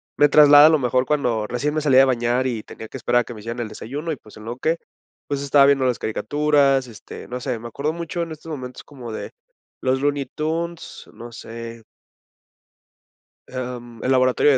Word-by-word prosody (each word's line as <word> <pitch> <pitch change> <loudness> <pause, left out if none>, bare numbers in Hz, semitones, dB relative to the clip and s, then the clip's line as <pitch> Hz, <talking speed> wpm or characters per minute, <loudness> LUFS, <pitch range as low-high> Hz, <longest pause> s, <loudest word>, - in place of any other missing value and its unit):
me 145 0 +5
traslada 145 0 +8
a - - +6
lo 155 - +4
mejor 125 0 +1
cuando 120 -8 0
recién 145 +6 -2
me 155 - 0
salía 135 -3 +5
de 135 - +7
bañar 125 0 +1
y 115 -4 -2
tenía 110 - -10
que - - -8
esperar 120 0 +2
a - - -4
que 120 - -9
me 110 - -10
hicieran 115 +2 -6
el 115 - -2
desayuno 145 +10 -5
y, - - -2
pues, 105 -4 -17
en 110 - -11
lo 120 +2 -5
que 160 +5 0 0.5
pues 140 -1 -2
estaba 140 0 +5
viendo 135 -2 +3
las 125 -2 0
caricaturas, 140 +3 +1
este, 115 - -11
no 125 +1 -5
sé, 125 -3 -3
me 120 - -8
acuerdo 145 +7 -3
mucho 170 0 -4
en 165 - -7
estos 160 +1 -10
momentos 125 -4 -7
como 125 -6 -10
de - - -6 0.5
los 130 +1 +1
Looney 145 -1 0
Tunes, 165 +2 -4
no 120 +1 -10
sé. 115 0 -9 1.7
Am, 120 -2 -6
El 130 - +1
Laboratorio 130 +2 +4
130 Hz, 205 wpm, -22 LUFS, 120-145 Hz, 1.7 s, traslada